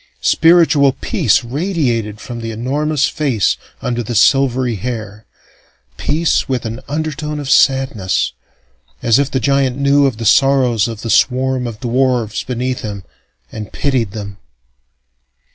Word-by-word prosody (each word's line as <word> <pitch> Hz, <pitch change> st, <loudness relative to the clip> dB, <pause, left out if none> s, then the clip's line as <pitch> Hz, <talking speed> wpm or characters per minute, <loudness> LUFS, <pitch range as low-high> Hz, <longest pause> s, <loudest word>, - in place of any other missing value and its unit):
Spiritual 160 Hz, -5 st, +4 dB
peace 130 Hz, -, +1 dB
radiated 120 Hz, -, -2 dB
from 120 Hz, 0 st, -7 dB
the 115 Hz, -, -5 dB
enormous 140 Hz, +6 st, -1 dB
face 135 Hz, -, 0 dB, 0.3 s
under 120 Hz, -1 st, -1 dB
the 120 Hz, +1 st, -5 dB
silvery 130 Hz, -1 st, +3 dB
hair, 110 Hz, -1 st, -6 dB, 0.7 s
peace 160 Hz, -, 0 dB
with 125 Hz, -3 st, -2 dB
an 115 Hz, +2 st, -4 dB
undertone 150 Hz, 0 st, -3 dB
of 145 Hz, -, -6 dB
sadness, 130 Hz, -8 st, +2 dB, 0.7 s
as 115 Hz, +2 st, +4 dB
if 140 Hz, -1 st, +1 dB
the 130 Hz, -, -1 dB
giant 135 Hz, -2 st, +1 dB
knew 140 Hz, 0 st, +3 dB
of 125 Hz, -5 st, -3 dB
the 115 Hz, -, -5 dB
sorrows 125 Hz, -2 st, +3 dB
of 115 Hz, -2 st, -7 dB
the 115 Hz, -, -2 dB
swarm 130 Hz, -1 st, +1 dB
of 115 Hz, -2 st, -8 dB
dwarfs 125 Hz, -3 st, 0 dB
beneath 125 Hz, 0 st, -3 dB
him, 100 Hz, -3 st, -6 dB, 0.5 s
and 105 Hz, -1 st, -7 dB
pitied 130 Hz, -7 st, 0 dB
them. 100 Hz, -1 st, -8 dB
130 Hz, 135 wpm, -16 LUFS, 115-140 Hz, 0.7 s, Spiritual